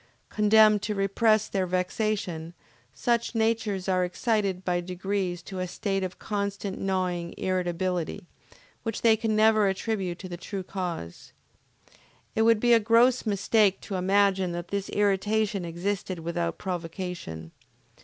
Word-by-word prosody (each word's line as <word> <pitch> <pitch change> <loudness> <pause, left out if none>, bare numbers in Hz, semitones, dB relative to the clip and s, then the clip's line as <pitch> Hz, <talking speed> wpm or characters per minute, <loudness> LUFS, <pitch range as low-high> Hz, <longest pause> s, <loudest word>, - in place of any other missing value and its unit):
Condemned 215 0 +5
to 210 +1 -2
repress 215 +2 +2
their 190 -2 -1
vexation, 180 -2 -2 0.4
such 235 - 0
natures 220 -4 0
are 185 -1 +2
excited 195 0 -1
by 175 -1 +1
degrees 180 0 -3
to 190 0 -7
a 185 - -2
state 195 +2 -2
of 185 -1 -5
constantly 200 -1 -3
gnawing 180 -3 -1
irritability, 180 0 -2 0.6
which 225 -2 -4
they 225 -1 +6
can 220 -1 -1
never 215 -1 +4
attribute 190 -2 -2
to 185 - -8
the 175 -1 -6
true 195 +2 -5
cause. 175 - -6 1.0
It 220 - +1
would 225 -1 +5
be 240 +1 +4
a 230 - +7
gross 230 +3 +3
mistake 200 -1 +2
to - - -7
imagine 190 -1 +2
that 175 0 -5
this 200 -1 -3
irritation 205 -1 +1
existed 180 +2 -3
without 170 +1 -2
provocation. 170 - -5
195 Hz, 135 wpm, -27 LUFS, 180-215 Hz, 1.0 s, a